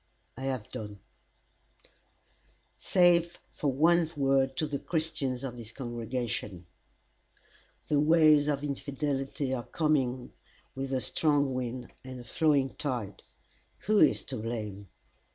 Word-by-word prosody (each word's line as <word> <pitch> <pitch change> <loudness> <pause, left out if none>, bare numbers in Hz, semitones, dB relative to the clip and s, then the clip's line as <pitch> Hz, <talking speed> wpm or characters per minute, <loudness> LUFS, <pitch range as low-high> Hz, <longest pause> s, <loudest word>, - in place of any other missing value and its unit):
I 130 - -6
have 130 -5 -2
done 105 -4 -6 1.8
"Save 175 -1 +3
for 145 - -1
one 165 +4 +3
word 135 -1 +2
to 155 - +1
the 145 -2 -3
Christians 155 -6 -2
of 125 -2 -5
this 115 -2 -8
congregation: 120 -6 -4 1.2
"The 145 - +2
waves 155 -1 +5
of 145 -1 0
infidelity 140 -1 -2
are 125 - -1
coming 150 -1 +1
in 125 -1 -11 0.4
with 135 0 -4
a 130 -1 0
strong 145 +3 +1
wind 125 -1 -4
and 130 -1 -8
a - - -9
flowing 140 +1 +2
tide. 120 -9 -3 0.6
Who 210 0 +2
is - - +4
to 130 - -5
blame? 105 -3 -5
135 Hz, 125 wpm, -30 LUFS, 125-150 Hz, 1.8 s, waves